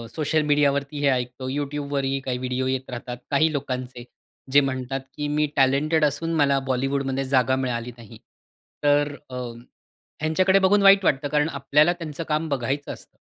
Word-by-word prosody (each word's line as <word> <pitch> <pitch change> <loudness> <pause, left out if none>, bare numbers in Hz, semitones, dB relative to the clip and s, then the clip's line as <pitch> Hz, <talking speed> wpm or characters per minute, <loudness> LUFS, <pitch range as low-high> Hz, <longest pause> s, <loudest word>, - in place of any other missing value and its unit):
Social 155 0 +1
मीडियावरती 145 0 +1
हे 145 - +1
ऐकतो 125 0 -2
YouTubeवरही 140 -1 -2
काही 125 -1 -2
व्हिडिओ 130 0 -2
येत 130 0 -2
राहतात 120 0 -6
काही 155 +3 +3
लोकांचे. 130 -3 -4 0.5
जे 145 - +7
म्हणतात 135 0 -3 0.2
की 150 0 -3
मी 150 +1 +1
टॅलेंटेड 150 +4 +3
असून 165 +4 -1
मला 140 -3 +3
बॉलिवूडमध्ये 135 +1 -1
जागा 130 -1 +2
मिळाली 125 -2 -3
नाही. 115 -1 -13 0.7
तर 145 0 +3 0.2
अ, 130 - -8 0.9
ह्यांच्याकडे 185 +5 +3
बघून 200 +2 +3
वाईट 195 0 +6
वाटतं. 145 -2 +1
कारण 150 +2 +1
आपल्याला 145 +3 +2
त्यांचं 165 -2 -6
काम 155 +1 0
बघायचं 140 +1 -2
असतं. - - -14
140 Hz, 155 wpm, -24 LUFS, 130-150 Hz, 0.9 s, जे